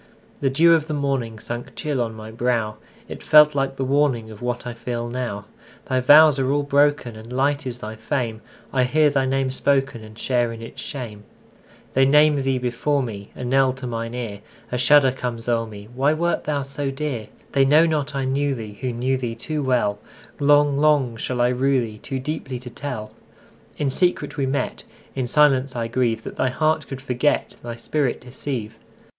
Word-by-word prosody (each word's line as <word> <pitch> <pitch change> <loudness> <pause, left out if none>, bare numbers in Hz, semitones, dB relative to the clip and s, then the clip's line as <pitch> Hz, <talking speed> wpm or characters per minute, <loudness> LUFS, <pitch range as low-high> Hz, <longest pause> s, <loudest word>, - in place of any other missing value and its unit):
The 135 - +1
dew 165 +5 +5
of 160 -2 +2
the 155 - -2
morningSunk 120 -4 -3
chill 145 -5 -1
on 115 -2 -3
my 110 0 -9
brow; 115 -2 -1 0.3
It - - -8
felt 150 0 +6
like 135 -1 -1
the 135 - -2
warningOf 130 -6 0
what 120 0 -3
I 120 - -4
feel 120 0 -4
now. 120 -5 -4 0.4
Thy 130 -2 0
vows 145 +2 +7
are 130 -1 +1
all 145 0 +1
broken, 145 -4 +2
And 110 +2 -11
light 140 +2 0
is 125 -1 -4
thy 110 -2 -7
fame:I 120 +1 -3
hear 150 +3 +3
thy 135 -2 +1
name 135 0 0
spokenAnd 130 -5 0
share 120 0 0
in 115 - -8
its 115 - -9
shame. 115 -7 -7 0.7
They 135 0 +4
name 150 0 +5
thee 135 -1 0
before 125 +3 0
me,A 105 +1 -7
knell 130 +1 +3
to 130 0 -8
mine 115 0 -4
ear;A 115 +1 -7
shudder 135 +1 +5
comes 120 -3 -5
o'er 115 -1 +1
me—Why 120 +7 -1
wert 170 +2 -1
thou 145 -2 -1
so 140 +1 -4
dear? 135 -5 -4 0.2
They 135 - +4
know 150 +4 +5
not 150 -4 -1
I 135 -1 -1
knew 140 +1 0
theeWho 115 +2 -5
knew 130 +2 0
thee 120 -3 -4
too 150 +6 -3
well:Long, 140 +4 +1
long 145 -5 +3
shall 125 +2 -2
I 120 - +4
rue 130 +2 +2
theeToo 115 +4 -6
deeply 135 -3 -4
to 125 -1 -9
tell.In 135 +2 -7
secret 180 +6 0
we 140 -3 -1
met:In 135 -1 -4
silence 135 -1 +3
I 115 -1 -2
grieveThat 115 -1 -1
thy 130 - +1
heart 155 +3 0
could 135 -1 -7
forget, 130 +2 0
Thy 120 -1 -6
spirit 130 +3 -1
deceive. 125 -3 -6
130 Hz, 175 wpm, -22 LUFS, 120-140 Hz, 0.7 s, vows